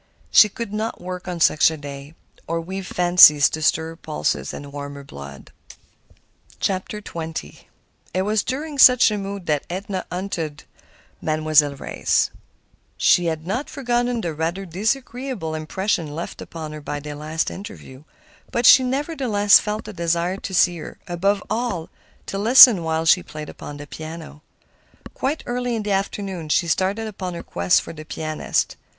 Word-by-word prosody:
She 210 - +7
could 210 0 -6
not 220 +2 -3
work 180 0 -7
on 175 -2 -4
such 155 -1 +5
a 160 - -6
day, 145 +1 -9 0.3
nor 165 +1 -1
weave 190 +3 -6
fancies 175 -5 +6
to 155 - -4
stir 160 +1 +1
her 165 - -9
pulses 75 - -2
and 145 -1 -9
warm 145 0 -6
her 140 - -9
blood. 70 - -11 1.1
XX 170 - -4 0.5
It 185 - 0
was 210 +1 +1
during 290 +4 -4
such 250 -3 +7
a 210 - -1
mood 195 -1 -6
that 150 -3 -1
Edna 190 +1 -4
hunted 170 -5 -4
up - - -32 0.4
Mademoiselle 155 -2 +2
Reisz. - - 0 0.7
She 175 - +4
had 160 -1 -2
not 235 +10 -3
forgotten 245 -3 -1
the 170 -4 -3
rather 165 +5 -3
disagreeable 230 0 -3
impression 160 0 -2
left 170 - -6
upon 160 -2 -7
her 155 0 -8
by 145 0 -4
their 150 +1 -7
last 155 +2 -3
interview; 190 -9 -10 0.5
but 235 0 0
she 260 - +8
nevertheless 255 -7 +3
felt 210 +1 -4
a 215 - -7
desire 170 +1 -1
to 195 - -7
see 175 -1 +3
her—above 195 +5 -2
all, 220 -7 -2 0.4
to 195 - -4
listen 230 -2 +8
while 160 0 -1
she 180 +2 +5
played 155 -3 -9
upon 145 - -9
the 145 - -8
piano. 155 0 -9 0.7
Quite 285 +4 -2
early 245 0 -2
in 220 - -3
the 205 - -3
afternoon 195 -4 -3
she 170 +3 +2
started 190 +6 0
upon 190 -4 -5
her - - -7
quest 90 +1 +1
for - - -9
the 155 -1 -9
pianist. 155 0 -2
175 Hz, 160 wpm, -22 LUFS, 155-210 Hz, 1.1 s, she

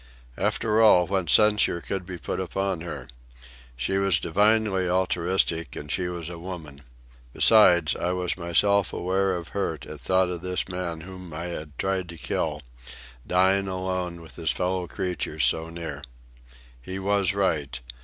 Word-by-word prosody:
After 110 0 +1
all, 90 -5 +6
what 95 -3 -1
censure 105 -3 +4
could 90 +1 -4
be 95 -2 -6
put - - -4
upon 95 -3 -2
her? 85 - -6 0.7
She 80 +11 0
was 95 -4 +3
divinely 100 0 +2
altruistic, 90 -4 0
and 75 0 -6
she 90 +5 0
was 85 -2 -5
a 85 -1 -7
woman. 80 -6 -8 0.5
Besides, 90 -8 +5
I 90 - -1
was 90 -1 -1
myself 95 +3 +2
aware 95 +1 0
of 85 -2 -6
hurt 85 -7 -3
at - - -8
thought 95 -1 +2
of 90 -1 -4
this 90 0 -2
man 90 -3 -4
whom 90 0 -9
I 85 +3 -4
had 75 -2 -8
tried 95 -2 -1
to 85 - -9
kill, - - -2 0.6
dying 95 +2 +3
alone 90 -2 -3
with 80 - -13
his 80 -3 -1
fellow 90 0 0
creatures 90 0 -2
so 80 0 +1
near. 85 -1 -6 0.8
He 95 +10 -6
was 100 0 +1
right. 75 -10 0
90 Hz, 155 wpm, -26 LUFS, 85-95 Hz, 0.8 s, all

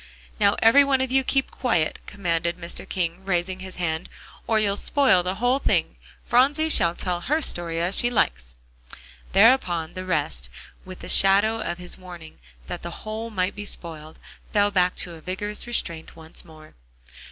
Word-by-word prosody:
"Now, 200 -1 +4
every 230 +6 +7
one 275 -1 +2
of 260 -1 -1
you 265 0 +3
keep 270 0 0
quiet," 175 -11 0
commanded 170 -3 -1
Mr. 170 -1 -6
King, 175 0 -2
raising 185 -1 -1
his 185 0 -8
hand, 160 -1 -2 0.4
"or 225 - +3
you'll 200 -2 +1
spoil 255 -5 +3
the 180 +2 -2
whole 245 +5 +1
thing. - - +1 0.3
Phronsie 290 +6 +3
shall 170 - +2
tell 175 -2 -2
her 300 - +1
story 170 - -1
as 175 +3 +1
she 240 - +3
likes." - - 0 0.8
Thereupon 190 -6 +4
the 185 - -6
rest, 160 -5 -2 0.4
with 185 -1 -10
the - - -8
shadow 205 +4 +3
of 175 -3 -3
his 180 +1 -4
warning 175 -4 -11 0.3
that - - -6
the 170 +4 -8
whole 220 +2 -4
might 190 -3 -1
be 205 - -7
spoiled, 160 -5 -5 0.3
fell 205 -1 +3
back 180 -2 +2
to 175 - -4
a 160 - -12
vigorous 205 +6 -4
restraint 170 -9 -3
once 160 -1 -8
more. 155 -2 -16
185 Hz, 175 wpm, -24 LUFS, 170-220 Hz, 0.8 s, every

